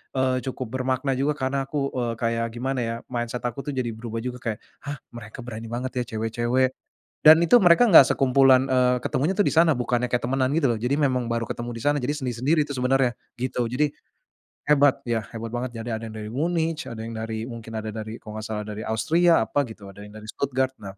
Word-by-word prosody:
eee, 130 Hz, -1 st, +2 dB
cukup 130 Hz, -, -4 dB
bermakna 130 Hz, +1 st, 0 dB
juga 145 Hz, +2 st, +1 dB
karena 135 Hz, 0 st, -2 dB
aku, 140 Hz, -2 st, -2 dB
eee, 120 Hz, -2 st, -2 dB
kayak 115 Hz, 0 st, 0 dB
gimana 130 Hz, +2 st, -2 dB
ya 115 Hz, -1 st, -2 dB, 0.2 s
mindset 120 Hz, 0 st, -3 dB
aku 120 Hz, +2 st, -3 dB
tuh 145 Hz, -, -3 dB
jadi 120 Hz, -3 st, -1 dB
berubah 115 Hz, 0 st, -6 dB
juga 125 Hz, 0 st, -4 dB
kayak, 110 Hz, -3 st, -4 dB, 0.3 s
"Hah, 145 Hz, 0 st, -4 dB
mereka 120 Hz, +1 st, -9 dB
berani 115 Hz, -1 st, -7 dB
banget 125 Hz, +2 st, -3 dB
ya -, -, 0 dB
cewek-cewek," 120 Hz, +4 st, +1 dB, 0.5 s
dan 155 Hz, +1 st, +10 dB
itu 170 Hz, +8 st, +5 dB
mereka 180 Hz, +7 st, +6 dB
gak 140 Hz, -6 st, +10 dB
sekumpulan, 130 Hz, -1 st, +5 dB
eee, 125 Hz, -1 st, +3 dB
ketemunya 150 Hz, +8 st, 0 dB
tuh 205 Hz, -, +4 dB
disana 165 Hz, 0 st, +4 dB
bukannya 125 Hz, 0 st, 0 dB
kayak 125 Hz, -, +1 dB
temenan 130 Hz, 0 st, +1 dB
gitu 155 Hz, -3 st, +2 dB
loh 115 Hz, -, 0 dB
jadi 125 Hz, +5 st, 0 dB
memang 130 Hz, -3 st, +1 dB
baru 115 Hz, -1 st, -2 dB
ketemu 120 Hz, 0 st, -4 dB
disana 145 Hz, +6 st, 0 dB
jadi 145 Hz, +4 st, -1 dB
sendiri-sendiri 130 Hz, +5 st, 0 dB
tuh 140 Hz, -, -4 dB
sebenarnya 125 Hz, -1 st, +2 dB, 0.3 s
gitu 125 Hz, -1 st, -1 dB
jadi, 125 Hz, +6 st, +1 dB, 0.8 s
hebat 145 Hz, -2 st, +4 dB
ya 115 Hz, -2 st, 0 dB
hebat 115 Hz, 0 st, -7 dB
banget 120 Hz, -1 st, -4 dB
jadi 115 Hz, 0 st, -4 dB
ada 110 Hz, 0 st, -5 dB
yang 110 Hz, -, -10 dB
dari 105 Hz, -, -6 dB
Munich 160 Hz, -1 st, -1 dB
ada 115 Hz, -, -7 dB
yang 115 Hz, -, -6 dB
dari 110 Hz, 0 st, -4 dB
mungkin 115 Hz, -2 st, -8 dB
ada 110 Hz, 0 st, -4 dB
dari 110 Hz, +1 st, -6 dB
kalau 110 Hz, 0 st, -8 dB
gak -, -, -7 dB
salah 105 Hz, -1 st, -3 dB
dari 105 Hz, 0 st, -6 dB
Austria 160 Hz, +5 st, +3 dB
apa 145 Hz, -, 0 dB
gitu 110 Hz, -6 st, -8 dB
ada 100 Hz, +1 st, -11 dB
yang 105 Hz, -, -10 dB
dari 110 Hz, -, -11 dB
Stuttgart 130 Hz, +2 st, -1 dB
nah, 100 Hz, -1 st, -9 dB
125 Hz, 215 wpm, -24 LUFS, 115-135 Hz, 0.8 s, dan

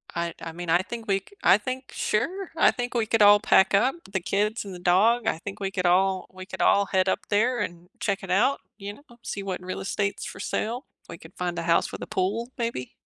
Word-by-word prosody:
I 170 Hz, 0 st, -2 dB
I 165 Hz, -, -5 dB
mean, 175 Hz, +1 st, -7 dB
I 170 Hz, +2 st, +5 dB
think 230 Hz, +3 st, -7 dB
we 195 Hz, -1 st, +2 dB
c 195 Hz, -, -30 dB, 0.2 s
I 195 Hz, -, +7 dB
think 255 Hz, +4 st, -6 dB
sure, 355 Hz, -, -1 dB
I -, -, +6 dB
think 245 Hz, 0 st, -4 dB
we 235 Hz, -2 st, +1 dB
could 225 Hz, 0 st, +1 dB
all 205 Hz, 0 st, +8 dB
pack 190 Hz, -2 st, +4 dB
up, 245 Hz, +9 st, +3 dB, 0.2 s
the 190 Hz, -, 0 dB
kids 210 Hz, +5 st, -1 dB
and 195 Hz, -, -7 dB
the 180 Hz, -, -8 dB
dog, 215 Hz, +7 st, +3 dB
I -, -, +1 dB
think 200 Hz, +3 st, -7 dB
we 195 Hz, -1 st, -2 dB
could 185 Hz, -2 st, -2 dB
all 185 Hz, +1 st, +2 dB
we 185 Hz, 0 st, -9 dB
could -, -, -6 dB
all 200 Hz, 0 st, +4 dB
head 185 Hz, -1 st, +1 dB
up -, -, -2 dB
there 235 Hz, +4 st, +2 dB
and 175 Hz, +1 st, -5 dB
check 195 Hz, -1 st, -1 dB
it 190 Hz, -, -5 dB
out, 235 Hz, +9 st, +3 dB, 0.2 s
you 200 Hz, -1 st, -6 dB
know, 245 Hz, 0 st, -19 dB
see 200 Hz, -, -4 dB
what 185 Hz, -2 st, -4 dB
real 185 Hz, 0 st, -5 dB
estates 200 Hz, +1 st, -2 dB
for -, -, -8 dB
sale. 240 Hz, +5 st, -3 dB, 0.2 s
We 170 Hz, -, -8 dB
could 160 Hz, -, -15 dB
find 175 Hz, -1 st, -2 dB
a -, -, -3 dB
house 170 Hz, 0 st, +2 dB
with -, -, -7 dB
a -, -, -5 dB
pool, 215 Hz, +6 st, -1 dB
maybe. 230 Hz, -, -3 dB
200 Hz, 250 wpm, -26 LUFS, 185-230 Hz, 0.2 s, all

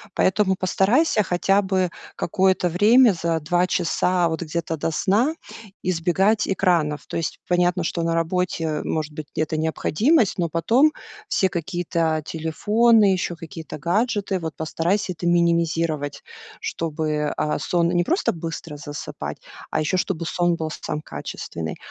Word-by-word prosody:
Поэтому 190 Hz, 0 st, +2 dB
постарайся 210 Hz, -, +2 dB
хотя 195 Hz, +2 st, +2 dB
бы 185 Hz, -2 st, 0 dB, 0.3 s
какое-то 185 Hz, +1 st, +2 dB
время 215 Hz, +7 st, +5 dB
за 165 Hz, -1 st, -1 dB
2 175 Hz, +4 st, +1 dB
часа 180 Hz, 0 st, +1 dB
вот 160 Hz, 0 st, -3 dB
где-то 165 Hz, 0 st, -3 dB
до 160 Hz, +1 st, -2 dB
сна 215 Hz, -, +1 dB, 0.5 s
избегать 185 Hz, +4 st, +2 dB
экранов. 175 Hz, -6 st, +1 dB
То -, -, -7 dB
есть 165 Hz, -, -2 dB
понятно, 180 Hz, 0 st, +2 dB
что 170 Hz, -, -2 dB
на 165 Hz, 0 st, 0 dB
работе 165 Hz, -2 st, -1 dB
может 155 Hz, -1 st, -2 dB
быть 150 Hz, -1 st, -7 dB
где-то 155 Hz, 0 st, -1 dB
необходимость, 200 Hz, -, +2 dB
но 170 Hz, -2 st, +1 dB
потом 235 Hz, -, +3 dB, 0.4 s
все 190 Hz, -, +2 dB
какие-то 170 Hz, -2 st, -1 dB
телефоны, 205 Hz, +7 st, +3 dB
ещё 175 Hz, -1 st, -2 dB
какие-то 165 Hz, -2 st, -8 dB
гаджеты, 200 Hz, -, 0 dB
вот 160 Hz, -2 st, -5 dB
постарайся 180 Hz, +5 st, -1 dB
это 175 Hz, -, -7 dB
минимизировать, 165 Hz, -4 st, +1 dB, 0.4 s
чтобы, 155 Hz, -2 st, -2 dB
а, 150 Hz, -, 0 dB
сон 170 Hz, -1 st, +1 dB
не 175 Hz, -1 st, +2 dB
просто 350 Hz, -, +1 dB
быстро 165 Hz, -2 st, -6 dB
засыпать, 145 Hz, 0 st, -6 dB, 0.3 s
а -, -, 0 dB
ещё, 155 Hz, +4 st, 0 dB
чтобы 175 Hz, -2 st, -2 dB
сон 175 Hz, +1 st, +1 dB
был 160 Hz, -1 st, -3 dB
сам 150 Hz, -, -3 dB
качественный. 80 Hz, -, -6 dB
175 Hz, 140 wpm, -23 LUFS, 160-190 Hz, 0.5 s, время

